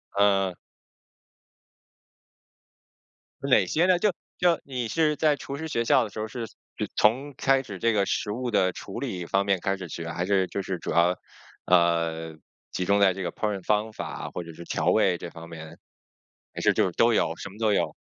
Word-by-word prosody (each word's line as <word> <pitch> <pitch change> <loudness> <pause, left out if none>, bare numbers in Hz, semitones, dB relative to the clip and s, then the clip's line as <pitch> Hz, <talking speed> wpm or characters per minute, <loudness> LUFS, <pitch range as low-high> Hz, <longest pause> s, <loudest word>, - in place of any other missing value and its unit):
嗯。 100 -2 +3 2.9
哪 115 -8 +5
些 160 - +2
呢？ 185 -1 +4
就 210 +2 +3 0.3
就 175 -2 +3
你 125 -4 -3
是 155 +1 +2
在 150 -1 +3
厨 140 - -6
师 160 +2 -5
学 115 -5 0
校 125 - +4
的 110 - -5
时 110 - -8
候 110 - -2
是 115 +1 -5 0.3
就 - - -2
从 130 +7 +2
开 135 -1 +3
始 100 -7 -8
这 115 +3 +2
个 100 -2 +2
食 105 - -1
物 120 +3 -3
的 95 -3 +2
处 - - -7
理 90 -2 -4
方 95 +3 +1
面 100 -2 +2
开 95 0 0
始 95 -2 -7
学？ 85 +1 -6
还 85 +1 -2
是 95 -1 +2
就 100 - -3
是 95 -1 -3
主 - - -5
要， 85 +1 +3 0.5
呃， 85 -2 +2 0.4
集 90 - -2
中 100 +2 +3
在 100 -2 +5
这 95 +1 -5
个 85 - -2
烹 105 -1 -2
饪 95 - -8
方 105 +2 0
法， - - -5
或 90 - -4
者 85 -1 -10
是 85 +2 -10
调 85 0 -2
味 90 -2 +4
这 85 - -7
方 85 0 -11
面？ 80 0 -10 0.8
还 - - -5
是 - - +4
就 - - +3
是 - - -1
都 - - +4
有， - - +1
什 - - -7
么 95 - -14
都 110 -2 +2
有？ - - +1
100 Hz, 225 characters per minute, -26 LUFS, 90-115 Hz, 2.9 s, 哪